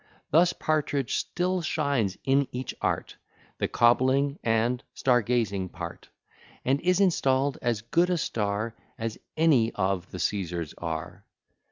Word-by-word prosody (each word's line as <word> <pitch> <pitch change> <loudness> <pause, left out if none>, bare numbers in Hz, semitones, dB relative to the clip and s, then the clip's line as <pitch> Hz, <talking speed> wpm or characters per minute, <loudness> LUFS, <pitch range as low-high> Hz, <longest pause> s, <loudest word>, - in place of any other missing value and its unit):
Thus 170 +4 +5
Partridge 145 -4 -1
still 180 +1 -1
shines 140 - 0
in 135 +1 +3
each 125 +1 -4
art, - - -2 0.4
The - - +1
cobbling 130 +4 +3
and 115 +2 +1
star 125 -2 +3
gazing 100 -5 0
part, 85 -2 -8 0.6
And 135 +2 +2
is 180 +1 +2
install'd 140 -7 +2
as 120 -3 0
good 170 +9 +2
a 180 - +2
star 110 -5 -1 0.2
As 115 -1 -4 0.2
any 140 -8 +4
of 95 -2 -1
the - - -7
Caesars 85 -6 -2
are. 80 -2 -5
125 Hz, 135 wpm, -27 LUFS, 105-145 Hz, 0.6 s, Thus